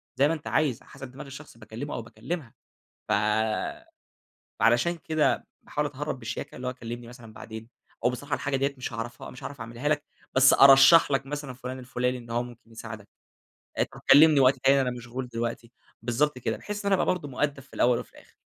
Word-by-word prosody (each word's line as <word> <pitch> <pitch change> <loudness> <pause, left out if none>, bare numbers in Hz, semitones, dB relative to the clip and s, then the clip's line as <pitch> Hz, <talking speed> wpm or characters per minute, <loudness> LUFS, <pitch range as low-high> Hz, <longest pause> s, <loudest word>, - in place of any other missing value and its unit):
زي 140 - +4
ما 160 - +1
أنتَ 155 -1 -6
عايِز، 145 -7 +1
حسب 135 -2 -11
دماغ 135 - -9
الشخص 135 0 -10
اللي 115 -1 -15
باكلِّمه 130 +7 -6
أو - - -3
باكلِّمها. 115 +4 -6 0.6
ف - - +1 1.5
فعلشان 170 0 +3
كده 155 -6 0 0.2
باحاول 150 0 -1
أتهرَّب 145 0 -4
بشياكة، - - -6
اللي 125 - -6
هو 125 - -1
كلِّمني 120 -1 -7
مثلًا 120 -2 -12
بعدين، 110 +1 -9 0.4
أو 125 - +5
بصراحة 125 +3 -4
الحاجة 135 -1 -1
دي 140 +1 0
مش 125 - -5
هاعرِفها 115 +1 -6
مش 125 - -12
هاعرَف 140 -3 -7
أعمِلها 120 +5 -4
لكَ، 145 -1 +1 0.3
بس 135 +1 +7
أرشَّح 140 +5 +8
لك 135 -1 0
مثلًا 145 -1 -5
فلان 125 +1 -7
الفلاني 125 0 -2
إن 120 -1 -12
هو 120 +1 0
ممكن 120 -1 -12
يساعِدك. 110 -2 -9 0.7
آآ، - - +4
طب - - -11
كلِّمني 150 +1 +8
وقت 130 0 +5
تاني، 135 +1 +5
أنا 125 - 0
مشغول 125 +1 -6
دلوقتي. 115 0 -4 0.3
بالضبط 130 +4 0
كده، 110 -2 -2
بحيث 210 0 -6
إن 200 - +1
أنا 195 - +6
أبقى - - +1
برضه 180 -5 -6
مؤدَّب 140 +1 -1
في 135 - -17
الأوَّل 120 0 +3
وفي - - -10
الآخِر. - - -19
130 Hz, 200 wpm, -27 LUFS, 120-145 Hz, 1.5 s, أرشَّح